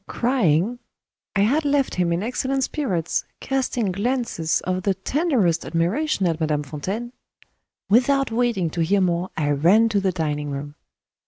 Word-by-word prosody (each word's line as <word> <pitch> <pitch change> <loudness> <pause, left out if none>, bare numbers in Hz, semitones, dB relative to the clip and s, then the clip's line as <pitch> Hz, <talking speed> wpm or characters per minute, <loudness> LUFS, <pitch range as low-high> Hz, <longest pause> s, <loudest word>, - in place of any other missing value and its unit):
Crying? 230 - +1 0.6
I 195 - +3
had 275 +10 +2
left 285 -2 +1
him 180 -2 0
in 170 +3 0
excellent 260 +3 -1
spirits, 190 - -1 0.2
casting 255 -6 -1
glances 205 -5 -1
of 185 0 -2
the 195 0 0
tenderest 230 - +1
admiration 195 - 0
at 165 -2 0
Madame 150 -2 0
Fontaine. 190 - -5 0.7
Without 255 +5 +3
waiting 225 -8 0
to 170 - -2
hear 195 +5 +2
more, 180 0 0
I 145 -2 +1
ran 185 +11 +4
to 205 -2 +1
the 195 -1 +1
dining 150 -4 -2
room. 145 +1 -5
195 Hz, 150 wpm, -23 LUFS, 165-245 Hz, 0.7 s, ran